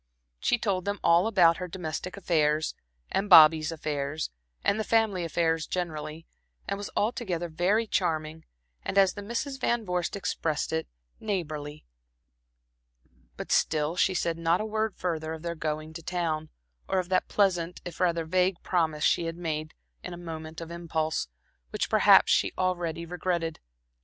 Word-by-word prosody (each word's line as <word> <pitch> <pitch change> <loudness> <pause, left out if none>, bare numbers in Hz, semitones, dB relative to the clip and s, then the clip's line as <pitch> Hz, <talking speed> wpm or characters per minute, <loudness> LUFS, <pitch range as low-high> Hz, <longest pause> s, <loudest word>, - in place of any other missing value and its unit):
She 245 - +2
told 195 -5 -1
them 200 -1 -2
all 170 +4 +5
about 175 -6 +5
her 180 - -4
domestic 175 +1 -5
affairs, 155 -4 +1 0.4
and 200 +1 0
Bobby's 155 -2 +8
affairs, 150 -1 -3 0.3
and 200 - +2
the - - 0
family 215 -5 +2
affairs 165 -1 0
generally, 160 -2 -4 0.4
and - - -1
was 205 - -5
altogether 190 -6 -1
very 185 +8 +1
charming 160 -5 -1 0.4
and - - -3
as 195 -1 +5
the 205 - -7
Misses 235 +6 -3
Van 240 -3 0
Vorst 180 -1 -1
expressed 160 -6 -2
it, 160 0 -1 0.3
"neighborly;" 155 -7 -4 1.5
but - - -6
still 155 +1 +2
she 185 +1 +2
said 165 -1 -1
not 165 +1 +2
a 215 - -2
word 220 -1 -1
further 160 -3 -3
of 160 0 -8
their 170 0 -2
going 155 -1 -4
to 165 - -7
town, 160 -2 -2 0.4
or 190 - 0
of 180 -1 -1
that 185 -1 +2
pleasant 180 -4 +1
if 175 - -7
rather 170 -2 +1
vague 185 +3 +2
promise 160 -4 0
she 170 - +3
had 165 0 -4
made 155 -2 -4 0.3
in 180 - -6
a - - -10
moment 160 -1 -7
of 165 0 -7
impulse, 160 -2 -2 0.4
which - - -2
perhaps - - +6
she - - +3
already 175 -3 -1
regretted. 170 -1 -2
170 Hz, 160 wpm, -28 LUFS, 160-185 Hz, 1.5 s, Bobby's